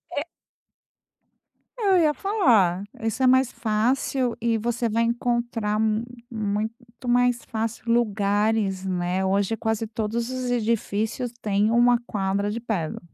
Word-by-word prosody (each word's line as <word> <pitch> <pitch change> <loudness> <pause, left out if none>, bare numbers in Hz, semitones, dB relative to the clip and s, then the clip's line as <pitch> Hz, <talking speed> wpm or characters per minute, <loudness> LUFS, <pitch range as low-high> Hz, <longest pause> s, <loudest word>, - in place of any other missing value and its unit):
É 285 - 0 1.6
Eu 395 -3 +3
ia 310 -2 +4
falar, 235 - +2 0.2
isso 225 +3 -2
é 260 - +5
mais 260 0 +4
fácil, 235 +3 0
e 230 -1 +1
você 235 +1 -1
vai 230 +2 +1
encontrar 235 -2 -1
m 220 +1 +1 0.3
muito 215 0 -2 0.3
mais 245 0 +2
fácil 225 0 -3
lugares, 205 -3 +1
né. 180 0 -1
Hoje 200 +3 +1
quase 220 0 -1
todos 225 +2 -3
os 255 -1 -3
edifícios 230 0 -1
têm 210 0 +1
uma 240 +1 +4
quadra 200 0 -1
de 225 +3 -3
Padel. 200 -9 -3
225 Hz, 130 wpm, -24 LUFS, 210-240 Hz, 1.6 s, é